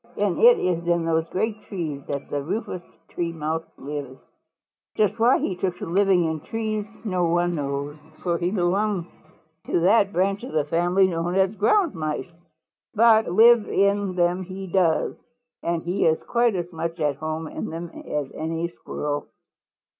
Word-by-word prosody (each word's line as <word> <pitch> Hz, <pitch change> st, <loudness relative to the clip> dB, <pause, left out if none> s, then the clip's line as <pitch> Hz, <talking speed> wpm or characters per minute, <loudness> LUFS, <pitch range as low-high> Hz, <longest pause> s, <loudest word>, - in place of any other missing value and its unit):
And -, -, 0 dB
it 475 Hz, +1 st, +7 dB
is 170 Hz, -1 st, -1 dB
in 170 Hz, -1 st, +2 dB
those 165 Hz, 0 st, 0 dB
great 215 Hz, +2 st, -2 dB
trees 160 Hz, -8 st, -4 dB
that 140 Hz, -1 st, -4 dB
the 145 Hz, -, -1 dB
Rufous 180 Hz, +3 st, -4 dB, 0.3 s
Tree 170 Hz, -1 st, -2 dB
Mouse 160 Hz, 0 st, -3 dB
lives. 140 Hz, -2 st, -6 dB, 0.8 s
"Just 210 Hz, 0 st, +1 dB
why 240 Hz, +3 st, +5 dB
he 185 Hz, -, -2 dB
took 180 Hz, -1 st, -2 dB
to -, -, -5 dB
living 185 Hz, 0 st, +3 dB
in 160 Hz, -1 st, -1 dB
trees 215 Hz, +3 st, -3 dB, 0.2 s
no 185 Hz, -4 st, +1 dB
one 175 Hz, +1 st, +1 dB
knows, 140 Hz, -1 st, -3 dB, 0.3 s
for 170 Hz, -2 st, 0 dB
he 175 Hz, -, 0 dB
belongs 190 Hz, 0 st, 0 dB, 0.6 s
to 170 Hz, -, +1 dB
that 200 Hz, +2 st, +4 dB
branch 195 Hz, +3 st, 0 dB
of 255 Hz, -, -7 dB
the 150 Hz, -2 st, +1 dB
family 175 Hz, +5 st, +3 dB
known 175 Hz, 0 st, -1 dB
as 190 Hz, +1 st, +3 dB
Ground 320 Hz, -, +2 dB
Mice. 155 Hz, +1 st, -3 dB, 0.6 s
But 225 Hz, 0 st, +5 dB
live 225 Hz, +3 st, +6 dB
in 200 Hz, -1 st, +1 dB
them 175 Hz, +1 st, +1 dB
he 190 Hz, +1 st, -7 dB
does, 175 Hz, -3 st, +1 dB, 0.5 s
and 170 Hz, -1 st, -1 dB
he 180 Hz, +2 st, +1 dB
is 160 Hz, 0 st, +1 dB
quite 235 Hz, -3 st, +2 dB
as 175 Hz, -1 st, -4 dB
much 165 Hz, +1 st, -4 dB
at 145 Hz, -3 st, 0 dB
home 155 Hz, +1 st, -4 dB
in -, -, -5 dB
them 165 Hz, +1 st, -6 dB
as 145 Hz, -2 st, -4 dB
any 165 Hz, +2 st, -3 dB
Squirrel." 150 Hz, -3 st, -4 dB
175 Hz, 170 wpm, -24 LUFS, 160-200 Hz, 0.8 s, it